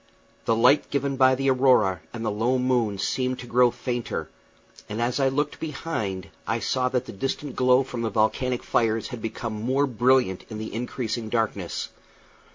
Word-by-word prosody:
The 115 - +3
light 125 +6 +4
given 140 0 -1
by 130 0 +5
the 135 +1 +2
aurora 125 -8 +4
and 115 -1 -5
the 110 - 0
low 115 +5 +1
moon 125 -5 +1
seemed 125 +6 -1
to 125 - -8
grow 125 +1 +4
fainter; 120 0 -4 0.6
and 105 +2 -4
as 120 +3 0
I 135 - +3
looked 145 +2 -1
behind 140 - -4 0.2
I 115 - +1
saw 125 +2 0
that 125 0 -1
the - - -8
distant 135 +6 -4
glow 125 +1 +4
from 125 -2 -5
the 115 - 0
volcanic 115 +4 0
fires 115 -1 +1
had 125 -3 -7
become 115 +1 -4
more 130 +6 +1
brilliant 125 -5 +2
in 110 - -6
the 110 -1 -6
increasing 115 -1 -3
darkness. 110 -6 -2
125 Hz, 175 wpm, -25 LUFS, 110-130 Hz, 0.6 s, by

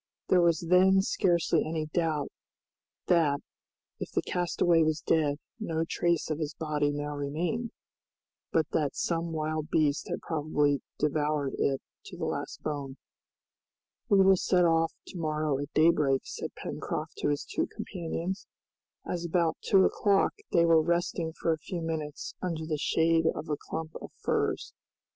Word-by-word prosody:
There 180 - +5
was 170 -2 +3
then 190 +2 +5
scarcely 175 -4 +2
any 155 0 -2
doubt 155 -2 -1 0.7
that, 155 -5 +3 0.6
if - - -4
the - - 0
castaway 175 -1 +2
was 155 -1 +2
dead, 150 -3 +1 0.2
no 165 -6 -1
trace 170 -2 0
of 155 - -2
his 150 -2 -3
body 150 -2 0
now 145 0 -3
remained, 165 +11 -2 0.8
but 160 -2 +3
that 150 -3 0
some 170 0 -1
wild 155 0 -2
beast 150 -2 +1
had - - -3
probably 150 -3 +1 0.2
devoured 150 -1 0
it 135 -1 +1 0.2
to - - -9
the - - -2
last - - -4
bone. 140 -3 -4 1.1
"We 200 -2 +6
will 190 0 +6
set 180 0 +3
off 165 -1 +3
to 180 - -8
morrow 155 -3 0
at 145 +1 -5
daybreak," 150 -4 +4
said - - -6
Pencroft - - -5
to - - 0
his 145 -1 0
two - - -1
companions, 185 -2 -5 0.6
as 175 -1 -3
about 170 -1 +1
two 190 -1 +5
o'clock 200 -2 +2 0.2
they 170 -1 +4
were 165 -1 +6
resting 170 0 0
for 165 0 0
a 160 - -5
few 175 +3 -5
minutes 155 -2 -4
under 165 -3 -2
the 155 -2 -2
shade 165 +1 +2
of 155 - -6
a 150 - +1
clump 160 +2 -6
of - - -8
firs. - - -1
160 Hz, 155 wpm, -29 LUFS, 150-170 Hz, 1.1 s, We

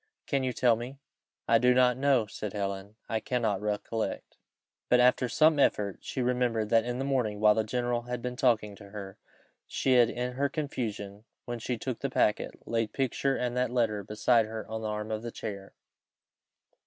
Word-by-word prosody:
Can 135 -1 0
you 130 - 0
tell 120 -1 +3
me?" 120 +4 -7 0.5
"I 115 0 +5
do 125 +1 +4
not 125 -1 +5
know," 130 -3 +3
said 105 0 -6
Helen, 100 0 -4
"I 110 - -1
cannot 110 -5 -1
recollect." 105 +1 -3 0.5
But 125 - +5
after 125 0 +4
some 155 +5 +4
effort, 100 -7 +2
she 130 - -3
remembered 120 -3 0
that 115 0 +4
in 120 0 -2
the 135 - -2
morning, 120 -7 0
while 105 0 +6
the 110 +1 +1
general 120 +2 -1
had 125 0 -4
been 125 +1 -4
talking 115 -5 +1
to 100 -1 -13
her, 100 -2 -8 0.5
she 130 - +1
had 120 -2 +6
in 125 +1 -3
her 140 +2 0
confusion, 110 -8 -4 0.2
when 120 -1 -4
she 120 +1 -2
took 125 +1 -4
the 140 - -2
packet, 105 -4 0
laid 115 -2 0
the - - -21
picture 135 +1 +1
and 125 -1 -2
that 125 0 +1
letter 115 -4 0
beside 110 +2 +2
her 110 0 -6
on 110 0 -4
the 110 - -3
arm 105 +1 -3
of 110 0 -2
the 120 - -5
chair. 100 -4 -7
115 Hz, 195 wpm, -29 LUFS, 105-125 Hz, 0.5 s, while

